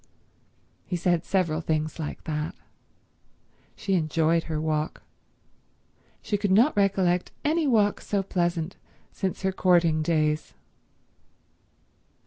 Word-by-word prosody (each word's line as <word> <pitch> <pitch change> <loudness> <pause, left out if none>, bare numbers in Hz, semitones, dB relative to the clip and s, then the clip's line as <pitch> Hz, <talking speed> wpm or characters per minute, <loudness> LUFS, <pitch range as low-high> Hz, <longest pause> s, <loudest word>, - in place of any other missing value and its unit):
He 180 - -4
said 175 -1 +1
several 170 -5 0
things 155 0 -2
like 155 - -5
that. 150 0 -3 1.2
She 195 - -2
enjoyed 165 -1 +2
her 155 -2 -2
walk. 155 0 -2 1.2
She 205 - -1
could 205 - 0
not 230 +10 +4
recollect 190 -3 +2
any 310 +1 +2
walk 210 -5 +2
so 200 -2 -1
pleasant 175 -2 -1 0.3
since 190 0 -3
her 190 - +2
courting 175 -4 +3
days. 155 -1 0
175 Hz, 110 wpm, -26 LUFS, 155-195 Hz, 1.2 s, not